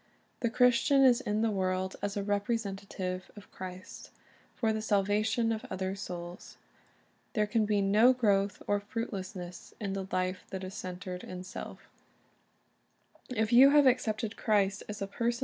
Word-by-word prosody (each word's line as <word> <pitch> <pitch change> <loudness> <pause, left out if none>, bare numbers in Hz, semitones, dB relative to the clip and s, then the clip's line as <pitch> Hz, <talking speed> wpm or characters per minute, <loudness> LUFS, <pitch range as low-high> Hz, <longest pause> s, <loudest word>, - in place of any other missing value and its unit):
The 235 - +1
Christian 250 +3 +4
is 255 -1 +5
in 210 -2 0
the 225 - +2
world 185 -1 -1
as 205 0 -2
a 200 - -1
representative 200 -3 -2
of 205 -1 -13
Christ, 185 0 -9 0.5
for 220 -2 +1
the 220 - -2
salvation 215 +2 +1
of 220 +1 -2
other 190 -1 -2
souls. 175 -3 -7 0.8
There 215 -3 +2
can 215 0 +1
be 205 -1 +2
no 215 +6 +6
growth 205 -5 +1
or 205 0 +1
fruitfulness 190 -4 -6
in 200 -3 -3
the 195 -1 -4
life 185 0 -1
that 190 -1 -5
is 185 +1 -6
centered 180 -1 -6
in 180 0 -7
self 185 - -8 1.4
If 220 -2 0
you 260 +3 +9
have 290 0 +6
accepted 225 -3 +1
Christ 205 -2 +1
as 210 -1 -4
a - - -1
personal 230 +4 -1
iZech. 235 - -7
205 Hz, 160 wpm, -31 LUFS, 190-225 Hz, 1.4 s, you